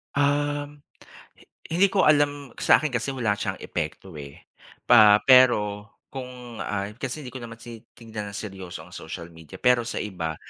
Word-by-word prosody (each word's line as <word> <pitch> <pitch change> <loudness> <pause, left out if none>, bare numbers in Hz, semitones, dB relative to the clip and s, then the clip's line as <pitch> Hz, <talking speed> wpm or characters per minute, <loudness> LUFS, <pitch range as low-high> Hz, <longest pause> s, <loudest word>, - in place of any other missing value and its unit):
Um, 145 0 0 0.6
hi - - -20 0.3
hindi 190 +4 +4
ko 195 - +3
alam, 145 -2 +2
sa'kin 155 - +4
kasi 120 +3 -2
wala 110 -5 0
siyang 95 -2 -4
epekto, 85 +1 -5
eh. 70 -1 -10 0.5
Pa 105 -3 +8
pero 105 -5 +5 0.2
kung 125 -3 -9
ay 105 +1 -4
kasi 135 +4 -5
hindi - - -7
ko 130 - -7
naman 115 0 -9
tinignan 115 -2 -9
ng - - -7
seryoso 95 -5 -7
ang 90 - -12
social 85 +1 -8
media, 80 -2 -13
pero 125 -1 +3
sa 120 - -4
iba, 85 -6 -4
115 Hz, 160 wpm, -25 LUFS, 100-135 Hz, 0.6 s, Pa